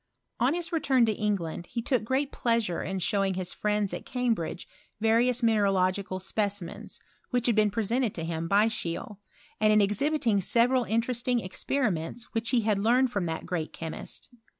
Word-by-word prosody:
On 255 Hz, +6 st, +2 dB
his 345 Hz, -1 st, -4 dB
return 270 Hz, -7 st, +3 dB
to 220 Hz, -, +1 dB
England 190 Hz, -5 st, -2 dB
he 235 Hz, -, -3 dB
took 255 Hz, -1 st, +1 dB
^ 265 Hz, +5 st, 0 dB
plea^re 230 Hz, -9 st, 0 dB
in 190 Hz, +1 st, -2 dB
showing 195 Hz, 0 st, 0 dB
his 185 Hz, -1 st, -2 dB
friends 210 Hz, -1 st, 0 dB
at -, -, -5 dB
Cambridge 230 Hz, -9 st, -2 dB, 0.3 s
vari 225 Hz, +2 st, +3 dB
minemlogical 200 Hz, -6 st, +1 dB
specimens, 200 Hz, -2 st, -3 dB, 0.3 s
which 245 Hz, -2 st, 0 dB
had 235 Hz, -, +3 dB
been 215 Hz, -1 st, +4 dB
presea 225 Hz, +3 st, 0 dB
to 165 Hz, -, -4 dB
him 165 Hz, 0 st, -3 dB
by 200 Hz, +4 st, +4 dB
Scheele. 210 Hz, -2 st, -4 dB, 0.4 s
and 215 Hz, 0 st, +4 dB
in 215 Hz, -, +5 dB
exhibiting 215 Hz, +1 st, +1 dB
several 245 Hz, +5 st, +3 dB
inten 235 Hz, +3 st, -1 dB
ing 245 Hz, -2 st, +2 dB
experiments 205 Hz, -, -2 dB
which 225 Hz, -1 st, -1 dB
he 245 Hz, -3 st, +3 dB
had 210 Hz, -2 st, +1 dB
learned 245 Hz, +4 st, +3 dB
from 200 Hz, -6 st, -1 dB
t 160 Hz, 0 st, -4 dB
great 170 Hz, -4 st, -3 dB
chemist. 160 Hz, -1 st, -7 dB
215 Hz, 170 wpm, -28 LUFS, 190-240 Hz, 0.4 s, in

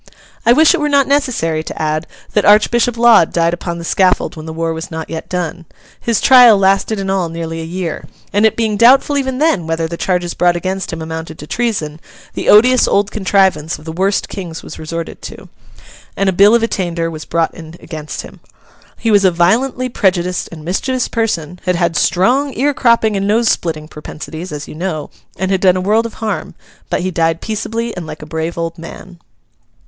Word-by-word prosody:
I -, -, +7 dB
wish 310 Hz, +5 st, +5 dB
it -, -, 0 dB
were 295 Hz, 0 st, 0 dB
not 280 Hz, -1 st, +3 dB
necessary 250 Hz, -, 0 dB
to 155 Hz, -, -8 dB
add 155 Hz, +1 st, -1 dB, 0.3 s
that 210 Hz, -, +2 dB
Archbishop 235 Hz, +3 st, +3 dB
Laud 230 Hz, -7 st, +5 dB
died 170 Hz, 0 st, +1 dB
upon 175 Hz, -1 st, -4 dB
the 170 Hz, -, -7 dB
scaffold 185 Hz, +1 st, +1 dB
when 155 Hz, 0 st, -9 dB
the -, -, -5 dB
war 165 Hz, 0 st, -2 dB
was 160 Hz, +1 st, -6 dB
not 160 Hz, -1 st, -6 dB
yet 160 Hz, -, -6 dB
done. 180 Hz, -1 st, -4 dB, 0.3 s
His 230 Hz, -3 st, 0 dB
trial 245 Hz, -5 st, +7 dB
lasted 195 Hz, +2 st, +1 dB
in 195 Hz, -, -3 dB
all 190 Hz, -3 st, 0 dB
nearly 165 Hz, 0 st, -5 dB
a -, -, -6 dB
year, 170 Hz, -2 st, -4 dB, 0.3 s
and, 205 Hz, +2 st, +2 dB
it 220 Hz, -, +4 dB
being 220 Hz, -2 st, 0 dB
doubtful 265 Hz, +5 st, +5 dB
even 265 Hz, -2 st, -1 dB
then 275 Hz, -, +1 dB
whether 165 Hz, 0 st, -1 dB
the 170 Hz, +1 st, -6 dB
charges 180 Hz, -2 st, -1 dB
brought 175 Hz, 0 st, +2 dB
against 190 Hz, +2 st, -3 dB
him 165 Hz, -1 st, -5 dB
amounted 160 Hz, 0 st, -6 dB
to -, -, -9 dB
treason, 165 Hz, -8 st, -2 dB, 0.3 s
the -, -, -2 dB
odious 250 Hz, +4 st, +6 dB
old 200 Hz, 0 st, +1 dB
contrivance 190 Hz, -5 st, +1 dB
of 150 Hz, -, -16 dB
the 160 Hz, -, -5 dB
worst 190 Hz, +4 st, 0 dB
kings 175 Hz, -5 st, -7 dB
was -, -, -10 dB
resorted 165 Hz, +1 st, -6 dB
to, -, -, -10 dB, 0.7 s
and 195 Hz, -, +1 dB
a -, -, 0 dB
bill 200 Hz, +5 st, +6 dB
of 235 Hz, -, +2 dB
attainder 170 Hz, -6 st, -2 dB
was 155 Hz, -1 st, -7 dB
brought 165 Hz, 0 st, -1 dB
in 160 Hz, 0 st, -11 dB
against 155 Hz, -2 st, -7 dB
him. -, -, -13 dB, 0.6 s
He 225 Hz, -, 0 dB
was 205 Hz, -1 st, +4 dB
a 190 Hz, -, +6 dB
violently 230 Hz, +10 st, +1 dB
prejudiced 180 Hz, -6 st, 0 dB
and 155 Hz, -2 st, -10 dB
mischievous 250 Hz, +8 st, -1 dB
person; 180 Hz, -7 st, -2 dB
had 180 Hz, -1 st, +1 dB
had 170 Hz, -1 st, 0 dB
strong 245 Hz, -, +2 dB
ear 285 Hz, +3 st, +1 dB
cropping 235 Hz, -4 st, +2 dB
and 195 Hz, 0 st, -1 dB
nose 225 Hz, +2 st, +2 dB
splitting 155 Hz, -3 st, -2 dB
propensities, 155 Hz, +3 st, -8 dB
as 150 Hz, -1 st, -6 dB
you -, -, -9 dB
know; 155 Hz, -2 st, -4 dB, 0.3 s
and 190 Hz, +2 st, -1 dB
had 190 Hz, -1 st, +1 dB
done 185 Hz, -1 st, +4 dB
a -, -, -1 dB
world 215 Hz, +4 st, +1 dB
of 230 Hz, -, -13 dB
harm. 220 Hz, -1 st, -4 dB, 0.3 s
But -, -, -1 dB
he 185 Hz, +1 st, -2 dB
died 165 Hz, -1 st, 0 dB
peaceably, 225 Hz, +2 st, -4 dB
and 175 Hz, -3 st, -6 dB
like -, -, -8 dB
a -, -, -8 dB
brave 160 Hz, +2 st, -4 dB
old 165 Hz, 0 st, -4 dB
man. 175 Hz, +1 st, -11 dB
185 Hz, 205 wpm, -16 LUFS, 165-220 Hz, 0.7 s, I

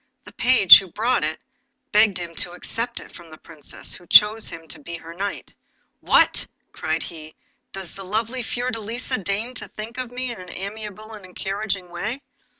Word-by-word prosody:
The -, -, -13 dB
page 230 Hz, -, +9 dB
who 195 Hz, -, -8 dB
brought 235 Hz, 0 st, +1 dB
it 155 Hz, +1 st, -2 dB, 0.5 s
begged 210 Hz, -2 st, +5 dB
him 170 Hz, -1 st, -5 dB
to 175 Hz, -, -2 dB
accept 230 Hz, +6 st, -3 dB
it -, -, -13 dB
from 170 Hz, -1 st, -13 dB
the 155 Hz, -, -12 dB
Princess, 155 Hz, -3 st, -8 dB
who 175 Hz, -, -9 dB
chose 215 Hz, +4 st, +6 dB
him 165 Hz, -1 st, -9 dB
to -, -, -7 dB
be 170 Hz, +3 st, -7 dB
her 165 Hz, 0 st, -10 dB
knight. 195 Hz, +3 st, -5 dB, 0.5 s
'What!' -, -, +3 dB, 0.2 s
cried -, -, -2 dB
he, 155 Hz, -2 st, -9 dB, 0.4 s
'does 190 Hz, -3 st, -8 dB
the 195 Hz, -, -8 dB
lovely 225 Hz, +6 st, -2 dB
Princess 230 Hz, -, -5 dB
Fiordelisa 235 Hz, -3 st, -2 dB
deign 210 Hz, +6 st, -2 dB
to -, -, -7 dB
think 225 Hz, +4 st, -8 dB
of 255 Hz, -2 st, -4 dB
me 250 Hz, 0 st, -4 dB
in 215 Hz, -6 st, -8 dB
this 180 Hz, -, -10 dB
amiable 215 Hz, +2 st, -7 dB
and 210 Hz, -2 st, -10 dB
encouraging 190 Hz, 0 st, -4 dB
way? 215 Hz, +10 st, -4 dB
205 Hz, 185 wpm, -23 LUFS, 175-230 Hz, 0.5 s, page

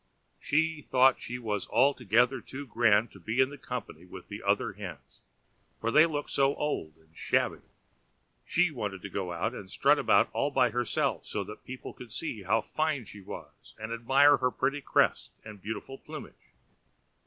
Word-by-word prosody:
She 160 Hz, +1 st, +1 dB
thought 130 Hz, 0 st, +5 dB
she 125 Hz, -, -5 dB
was 105 Hz, -5 st, -3 dB
altogether 125 Hz, -1 st, +3 dB
too 140 Hz, +5 st, -8 dB
grand 115 Hz, -3 st, +3 dB
to -, -, -14 dB
be 110 Hz, +4 st, -3 dB
in 130 Hz, +2 st, +3 dB
company 115 Hz, -11 st, -6 dB
with 90 Hz, -, -11 dB
the -, -, -7 dB
other -, -, +1 dB
hens, -, -, -10 dB, 0.6 s
for 115 Hz, -, -1 dB
they 155 Hz, +6 st, +7 dB
looked 145 Hz, -2 st, -4 dB
so 135 Hz, 0 st, +2 dB
old 80 Hz, -, -3 dB
and 80 Hz, 0 st, -28 dB
shabby; -, -, 0 dB, 0.8 s
she 180 Hz, -1 st, +2 dB
wanted 105 Hz, -8 st, -5 dB
to 100 Hz, -, -6 dB
go 95 Hz, -3 st, -3 dB
out 85 Hz, +8 st, -2 dB
and 100 Hz, -6 st, -8 dB
strut -, -, +3 dB
about -, -, +4 dB
all 140 Hz, -, +1 dB
by 125 Hz, -4 st, +3 dB
herself, 120 Hz, +1 st, -1 dB
so 100 Hz, -, -2 dB
that 105 Hz, +2 st, -11 dB
people 130 Hz, 0 st, -8 dB
could 125 Hz, -3 st, -12 dB
see 115 Hz, -5 st, -4 dB
how 105 Hz, +4 st, +2 dB
fine 155 Hz, -3 st, -1 dB
she 105 Hz, -, -11 dB
was, 95 Hz, -, -11 dB
and 110 Hz, +1 st, -5 dB
admire 135 Hz, +5 st, +5 dB
her 125 Hz, -1 st, +1 dB
pretty 140 Hz, +3 st, -1 dB
crest -, -, +2 dB, 0.2 s
and 105 Hz, -3 st, -10 dB
beautiful 110 Hz, +6 st, -6 dB
plumage. -, -, -11 dB
120 Hz, 175 wpm, -29 LUFS, 105-135 Hz, 0.8 s, they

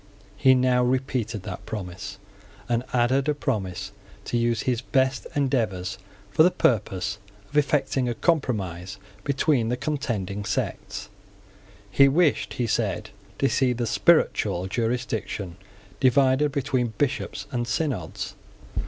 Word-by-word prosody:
He 130 Hz, +5 st, +5 dB
now 125 Hz, -1 st, +3 dB
repeated 125 Hz, -5 st, -1 dB
that -, -, -7 dB
promise, 95 Hz, -2 st, -6 dB, 0.5 s
and 120 Hz, 0 st, +1 dB
added 130 Hz, +4 st, +2 dB
a 150 Hz, -, +2 dB
promise 95 Hz, -9 st, -2 dB, 0.3 s
to -, -, -3 dB
use 115 Hz, -1 st, +1 dB
his 125 Hz, -2 st, 0 dB
best 130 Hz, +1 st, +1 dB
endeavours 115 Hz, -10 st, 0 dB, 0.3 s
for -, -, +4 dB
the 170 Hz, -, +8 dB
purpose 105 Hz, -, 0 dB, 0.3 s
of -, -, -12 dB
effecting 140 Hz, -3 st, +2 dB
a 120 Hz, -, -2 dB
compromise 100 Hz, -, -1 dB, 0.3 s
between 135 Hz, -4 st, +1 dB
the 125 Hz, -, 0 dB
contending 120 Hz, -, -2 dB
sects. 105 Hz, +1 st, -3 dB, 0.8 s
He 140 Hz, +7 st, +6 dB
wished, 155 Hz, +2 st, +2 dB
he 125 Hz, -, 0 dB
said, 105 Hz, -5 st, -1 dB, 0.3 s
to 135 Hz, -, +2 dB
see 130 Hz, -2 st, +2 dB
the 120 Hz, 0 st, -2 dB
spiritual 90 Hz, -4 st, +3 dB
jurisdiction 110 Hz, -4 st, -2 dB, 0.4 s
divided 135 Hz, +2 st, +4 dB
between 130 Hz, -5 st, -1 dB
bishops 140 Hz, -1 st, -1 dB
and 120 Hz, -2 st, -1 dB
synods. 140 Hz, -, -2 dB
125 Hz, 125 wpm, -25 LUFS, 105-135 Hz, 0.8 s, the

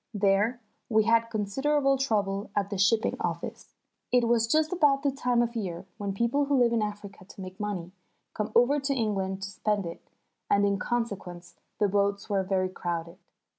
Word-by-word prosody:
There 205 Hz, +4 st, +2 dB, 0.3 s
we 220 Hz, -2 st, +4 dB
had 230 Hz, +1 st, +3 dB
considerable 270 Hz, +7 st, +1 dB
trouble 205 Hz, -6 st, -1 dB
at 200 Hz, 0 st, 0 dB
the 200 Hz, -, -2 dB
shipping 220 Hz, +4 st, +3 dB
office. -, -, -5 dB, 0.4 s
It 245 Hz, -2 st, +4 dB
was 230 Hz, -1 st, +3 dB
just 310 Hz, +6 st, +2 dB
about 290 Hz, -5 st, +3 dB
the 280 Hz, -, +2 dB
time 250 Hz, -3 st, +1 dB
of 235 Hz, 0 st, -3 dB
year 180 Hz, -6 st, -4 dB
when 200 Hz, -1 st, -2 dB
people 235 Hz, +8 st, +1 dB
who 280 Hz, -1 st, +2 dB
live 240 Hz, -2 st, +4 dB
in 230 Hz, -, +2 dB
Africa 205 Hz, -2 st, -5 dB
to 185 Hz, -, -15 dB
make 185 Hz, 0 st, -9 dB
money, 195 Hz, -4 st, -4 dB, 0.4 s
come 215 Hz, -, -3 dB
over 250 Hz, +5 st, +5 dB
to 275 Hz, 0 st, -1 dB
England 195 Hz, -5 st, -1 dB
to 195 Hz, -, -5 dB
spend 205 Hz, 0 st, -1 dB
it, 170 Hz, -, -9 dB, 0.4 s
and 200 Hz, 0 st, +4 dB
in 200 Hz, -1 st, +1 dB
consequence 195 Hz, -7 st, -3 dB, 0.2 s
the 210 Hz, -, +3 dB
boats 200 Hz, +1 st, 0 dB
were 195 Hz, -1 st, +2 dB
very 185 Hz, -1 st, 0 dB
crowded. 170 Hz, -1 st, -4 dB
210 Hz, 180 wpm, -28 LUFS, 195-240 Hz, 0.4 s, over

